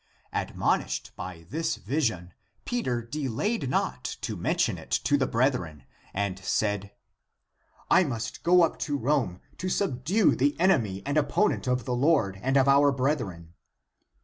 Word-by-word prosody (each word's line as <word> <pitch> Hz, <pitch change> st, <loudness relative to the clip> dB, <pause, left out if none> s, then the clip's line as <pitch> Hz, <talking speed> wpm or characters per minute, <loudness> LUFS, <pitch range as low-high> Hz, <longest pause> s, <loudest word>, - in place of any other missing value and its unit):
Admonished -, -, -1 dB
by 85 Hz, -3 st, -8 dB
this 165 Hz, +1 st, -1 dB
vision, 110 Hz, -, -2 dB, 0.3 s
Peter 130 Hz, -, -1 dB
delayed 140 Hz, -, -2 dB
not -, -, -1 dB
to -, -, -4 dB
mention -, -, 0 dB
it -, -, -13 dB
to 145 Hz, -, +2 dB
the 135 Hz, -2 st, +1 dB
brethren 115 Hz, -, 0 dB, 0.3 s
and 95 Hz, -1 st, -2 dB
said, 100 Hz, +1 st, -1 dB, 0.5 s
" -, -, -42 dB
I 185 Hz, -, +7 dB
must 115 Hz, -8 st, -4 dB
go 175 Hz, +1 st, +5 dB
up 165 Hz, -, 0 dB
to 145 Hz, -2 st, -1 dB
Rome, 130 Hz, -9 st, 0 dB, 0.2 s
to 185 Hz, -, -2 dB
sub 155 Hz, -10 st, -1 dB
due 195 Hz, -, +3 dB
the 145 Hz, +4 st, +1 dB
enemy 110 Hz, -, +2 dB
and 145 Hz, +2 st, 0 dB
opponent 175 Hz, +3 st, +1 dB
of 125 Hz, -2 st, 0 dB
the 125 Hz, -, -1 dB
Lord 120 Hz, -, +2 dB
and 135 Hz, +4 st, +2 dB
of 135 Hz, 0 st, +4 dB
our 140 Hz, +1 st, +5 dB
brethren." 120 Hz, -, -2 dB
130 Hz, 150 wpm, -27 LUFS, 105-150 Hz, 0.5 s, I